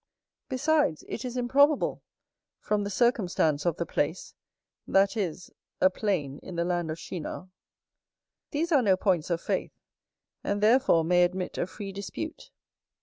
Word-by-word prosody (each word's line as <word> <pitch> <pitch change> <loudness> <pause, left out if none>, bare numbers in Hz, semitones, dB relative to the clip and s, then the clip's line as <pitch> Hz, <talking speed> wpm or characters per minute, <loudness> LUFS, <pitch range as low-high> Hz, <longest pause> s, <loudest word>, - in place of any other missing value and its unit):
Besides, 270 - +1
it - - -5
is 250 0 -4
improbable, 280 +4 +3 0.6
from 210 -1 -1
the 200 - -3
circumstance 185 - +1
of 170 - +1
the 170 - -2
place; 160 +3 -2 0.5
that 195 +3 +3
is, 185 -4 -3 0.3
a 185 - +5
plain 170 -10 -2
in 185 - -9
the 170 0 0
land 175 -2 -1
of 155 - -3
Shinar. 180 +2 -6 1.0
These 330 +3 -1
are 285 -5 +5
no 195 -5 +3
points 185 -4 +1
of 170 -1 0
faith; - - -2 0.7
and 200 0 -1
therefore 220 -5 +4
may 175 +2 +4
admit 180 +1 -2
a - - 0
free 200 +1 -7
dispute. 200 - -6
190 Hz, 145 wpm, -28 LUFS, 175-240 Hz, 1.0 s, a